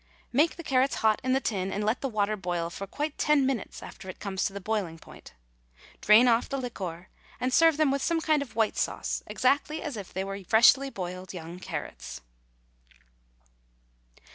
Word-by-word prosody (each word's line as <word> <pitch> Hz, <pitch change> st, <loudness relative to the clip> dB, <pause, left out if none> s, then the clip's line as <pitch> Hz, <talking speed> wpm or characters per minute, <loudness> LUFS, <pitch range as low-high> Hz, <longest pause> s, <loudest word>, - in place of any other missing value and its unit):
Make 300 Hz, +6 st, +3 dB
the 335 Hz, -, -8 dB
carrots 265 Hz, -2 st, +2 dB
hot 215 Hz, -1 st, +4 dB
in 255 Hz, 0 st, +1 dB
the 265 Hz, -, +3 dB
tin, 195 Hz, -7 st, -2 dB
and 205 Hz, -, -2 dB
let 220 Hz, +4 st, 0 dB
the 270 Hz, -, -1 dB
water 215 Hz, -2 st, 0 dB
boil, 175 Hz, -3 st, -3 dB
for 195 Hz, +3 st, -6 dB
quite 295 Hz, +8 st, -4 dB
ten 300 Hz, -3 st, +3 dB
minutes 260 Hz, -5 st, -3 dB
after 190 Hz, -, -10 dB
it -, -, -8 dB
comes 195 Hz, -2 st, -2 dB
to -, -, 0 dB
the 200 Hz, -, -6 dB
boiling 195 Hz, -5 st, -2 dB
point. 160 Hz, -, -14 dB, 0.7 s
Drain 220 Hz, +4 st, +7 dB
off 230 Hz, -1 st, +3 dB
the 275 Hz, -, -2 dB
liquor, 185 Hz, -9 st, -6 dB, 0.3 s
and 250 Hz, +1 st, -1 dB
serve 325 Hz, 0 st, +5 dB
them 310 Hz, -3 st, +3 dB
with 275 Hz, 0 st, 0 dB
some 335 Hz, +2 st, +1 dB
kind 310 Hz, -2 st, +2 dB
of 245 Hz, -7 st, -7 dB
white 220 Hz, -2 st, +1 dB
sauce -, -, -2 dB
exactly 290 Hz, +4 st, +1 dB
as 295 Hz, -8 st, -4 dB
if 200 Hz, -3 st, -8 dB
they 190 Hz, -, -2 dB
were 195 Hz, 0 st, -6 dB
freshly 240 Hz, +7 st, +5 dB
boiled 185 Hz, -3 st, -6 dB
young 170 Hz, +1 st, -8 dB
carrots. 60 Hz, -, -6 dB
220 Hz, 190 wpm, -28 LUFS, 190-275 Hz, 0.7 s, Drain